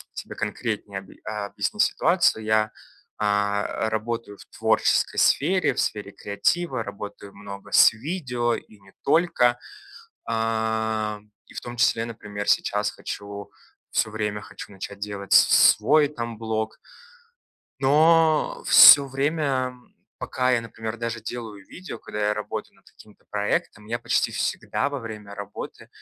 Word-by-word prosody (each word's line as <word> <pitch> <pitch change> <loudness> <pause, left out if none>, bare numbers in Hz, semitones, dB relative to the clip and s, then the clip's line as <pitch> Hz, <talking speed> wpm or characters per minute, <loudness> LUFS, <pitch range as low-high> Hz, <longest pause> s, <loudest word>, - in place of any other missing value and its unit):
тебе - - -7
конкретнее 105 -3 -4
об 95 - -17
объяснить 110 - -2
ситуацию: 170 -10 +2
я, 110 0 +2 0.5
а, 105 +1 0
работаю 110 -1 -4
в - - -13
творческой - - +2
сфере, 180 +6 +3
в - - -1
сфере 105 -1 -3
креатива, 130 - -1
работаю 100 0 -9
много 100 0 -10
с - - +7
видео 125 -3 -2
и 105 - -10
не 95 0 -20
только. 140 -7 +3 0.7
А, 110 -1 -1 0.3
и - - -16
в - - -6
том 120 0 -8
числе, 115 0 +2
например, 105 -3 -7
сейчас 105 0 +1
хочу- 100 0 -8 0.4
всё 110 - +1
время 105 -1 -3
хочу- - - -11
начать 100 +1 -8
делать 100 -1 -6
с - - +8 0.3
свой 145 +8 +3
там 120 -5 -6
блог. 110 -1 -3 1.0
Но 155 +3 +3
всё 140 -1 +10
время, 135 -2 -1 0.4
пока 130 0 -1
я, 120 - +2
например, 110 0 -7
даже 115 0 -4
делаю 110 -3 -7
видео, 185 -10 -9
когда 105 -1 -3
я 105 - +1
работаю 105 0 -6
над - - -28
каким-то 105 -1 -19
проектом, 105 +1 -2
я 115 +2 -2
почти 120 - 0
всегда 140 - -2
во 140 - -3
время 105 -3 -8
работы 100 0 -8
110 Hz, 135 wpm, -24 LUFS, 105-125 Hz, 1.0 s, всё